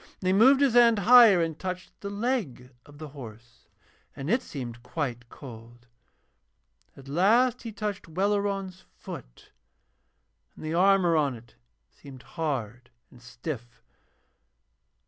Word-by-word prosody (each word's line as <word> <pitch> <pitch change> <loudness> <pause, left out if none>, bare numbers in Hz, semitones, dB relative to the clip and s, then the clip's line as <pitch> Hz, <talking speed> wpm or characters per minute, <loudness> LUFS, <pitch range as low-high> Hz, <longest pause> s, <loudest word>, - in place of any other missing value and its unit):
And - - -9
he 185 - +3
moved 260 +7 +5
his 275 -4 +3
hand 235 -2 +5
higher 215 -3 +7
and 160 -2 -4
touched 185 -1 -6
the 200 - -5
leg 200 - -3 0.2
of 145 0 -16
the 155 0 -9
horse, 120 - -13 0.5
and 140 +4 -4
it 240 +2 +2
seemed 120 -4 -8
quite 125 -3 -5
cold. 120 -2 -13 1.1
At 135 0 -14
last 220 - +2
he 230 - -7
touched 210 -3 -5
Welleran's 195 +1 -2
foot, - - -11 1.0
and - - -10
the 155 - -3
armour 185 -1 +3
on 145 -4 +1
it 115 0 -16 0.4
seemed 135 -2 -14
hard 125 -8 -5 0.2
and 120 - -18
stiff. 120 0 -8
160 Hz, 130 wpm, -27 LUFS, 125-200 Hz, 1.1 s, higher